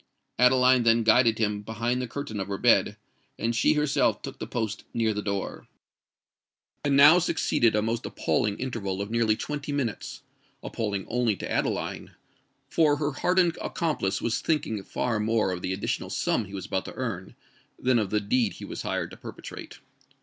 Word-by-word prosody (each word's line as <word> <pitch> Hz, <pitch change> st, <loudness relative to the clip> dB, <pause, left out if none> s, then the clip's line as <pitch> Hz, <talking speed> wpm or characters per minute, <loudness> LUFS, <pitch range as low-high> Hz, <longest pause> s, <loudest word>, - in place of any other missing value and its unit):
Adeline 125 Hz, 0 st, +5 dB
then 115 Hz, 0 st, +4 dB
guided 115 Hz, 0 st, +4 dB
him 105 Hz, -2 st, 0 dB
behind 115 Hz, +4 st, -2 dB
the 125 Hz, -, -3 dB
curtain 115 Hz, -4 st, -5 dB
of 95 Hz, -, -3 dB
her 100 Hz, -1 st, -3 dB
bed; -, -, +3 dB, 0.4 s
and 115 Hz, +1 st, -1 dB
she 115 Hz, -, +4 dB
herself 150 Hz, -2 st, +2 dB
took -, -, -7 dB
her -, -, -4 dB
post 110 Hz, -3 st, -3 dB
near 115 Hz, -2 st, +1 dB
the 105 Hz, -, -3 dB
door. 100 Hz, -1 st, -4 dB, 1.2 s
And 140 Hz, -1 st, +2 dB
now 150 Hz, +5 st, +8 dB
succeeded 135 Hz, -9 st, +1 dB
a 105 Hz, -, +2 dB
most 115 Hz, +2 st, -2 dB
appalling 105 Hz, -4 st, 0 dB
interval 105 Hz, -7 st, -3 dB
of 100 Hz, +2 st, -4 dB
nearly 115 Hz, -2 st, +2 dB
twenty 150 Hz, +3 st, -4 dB
minutes,—appalling 110 Hz, -5 st, -5 dB
only 120 Hz, -3 st, +1 dB
to -, -, -6 dB
Adeline; -, -, -2 dB, 0.5 s
for 150 Hz, -3 st, +3 dB
her 145 Hz, 0 st, -1 dB
hardened 175 Hz, +3 st, +1 dB
accomplice 155 Hz, -, -1 dB
was 115 Hz, -, 0 dB
thinking 135 Hz, -10 st, -1 dB
far 115 Hz, +3 st, -2 dB
more 110 Hz, -2 st, +1 dB
of 90 Hz, -1 st, -4 dB
the 90 Hz, -, -2 dB
additional 95 Hz, +1 st, -2 dB
sum 110 Hz, -, 0 dB
he 95 Hz, -, -13 dB
was 95 Hz, -2 st, -5 dB
about 95 Hz, -, -2 dB
to -, -, -8 dB
earn, -, -, -5 dB, 0.4 s
than 125 Hz, -2 st, +2 dB
of 105 Hz, -3 st, -1 dB
the 105 Hz, -, +1 dB
deed 110 Hz, +1 st, +1 dB
he -, -, -9 dB
was -, -, -6 dB
hired -, -, -2 dB
to -, -, -11 dB
perpetrate. -, -, -10 dB
115 Hz, 175 wpm, -27 LUFS, 105-130 Hz, 1.2 s, now